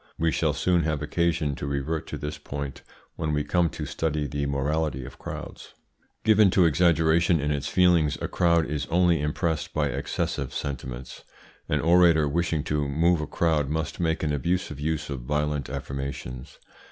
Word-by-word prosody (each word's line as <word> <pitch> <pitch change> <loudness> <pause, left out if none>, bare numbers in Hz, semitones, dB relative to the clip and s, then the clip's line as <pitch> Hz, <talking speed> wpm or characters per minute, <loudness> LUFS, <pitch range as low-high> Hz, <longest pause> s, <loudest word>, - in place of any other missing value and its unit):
We 80 0 +1
shall - - +1
soon 90 -2 +2
have 75 -2 -1
occasion 85 -2 0
to 70 - -5
revert 75 +3 -2
to 75 - -5
this 75 +1 -5
point 70 -2 -6 0.4
when 80 -2 -1
we 75 0 +1
come 85 +3 +2
to 75 - -6
study 75 0 -1
the 70 0 -2
morality 70 -1 -1
of 70 - -11
crowds. - - -8 0.5
Given 110 -2 +5
to 90 - +6
exaggeration 80 +1 +3
in 75 +1 -1
its 75 0 -2
feelings, 85 -5 +3
a - - -2
crowd 85 -2 +2
is 75 0 -3
only 85 -2 +3
impressed 80 +2 -2
by 75 -2 +1
excessive 70 0 -3
sentiments. 65 -3 -5 0.5
An - - +1
orator 85 -2 +5
wishing 80 0 0
to 75 -2 -1
move 80 +4 +2
a 75 - -4
crowd 75 -4 +1
must 80 0 -3
make 80 -2 0
an 75 -1 0
abusive 85 -1 -1
use 75 0 -2
of 70 - -3
violent 75 +1 -1
affirmations. 70 -1 -6
75 Hz, 170 wpm, -26 LUFS, 70-85 Hz, 0.5 s, to